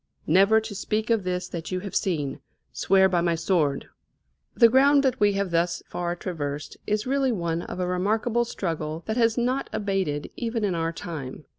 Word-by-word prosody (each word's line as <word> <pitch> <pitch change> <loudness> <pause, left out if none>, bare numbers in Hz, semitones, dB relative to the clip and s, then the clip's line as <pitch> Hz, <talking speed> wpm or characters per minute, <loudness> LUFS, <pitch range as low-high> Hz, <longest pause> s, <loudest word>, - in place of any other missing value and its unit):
_ - - -57 0.2
Never 195 +7 +5
to 220 -1 -7
speak 215 +3 -2
of 225 -4 +2
this 180 0 -2
that 170 -1 -6
you 185 0 -2
have 200 -1 -7
seen, 150 -8 -1 0.3
Swear 190 - +4
by 180 -2 +1
my 170 -1 +1
sword." 160 -4 0 0.7
The 235 - +7
ground 275 +4 +5
that 260 -2 +1
we 205 -1 +4
have 195 -2 -1
thus 170 +1 0
far 175 0 -3
traversed 150 -5 -5
is 210 0 0
really 270 0 +1
one 170 -5 -1
of 180 - -7
a 180 - 0
remarkable 215 +6 +1
struggle, 165 -7 -4
that 220 +2 -2
has 230 -1 +3
not 250 +3 0
abated 195 -8 -2
even 230 -2 -2
in 200 -3 +1
our 165 -1 -1
time. 150 -4 -7
190 Hz, 190 wpm, -25 LUFS, 170-220 Hz, 0.7 s, The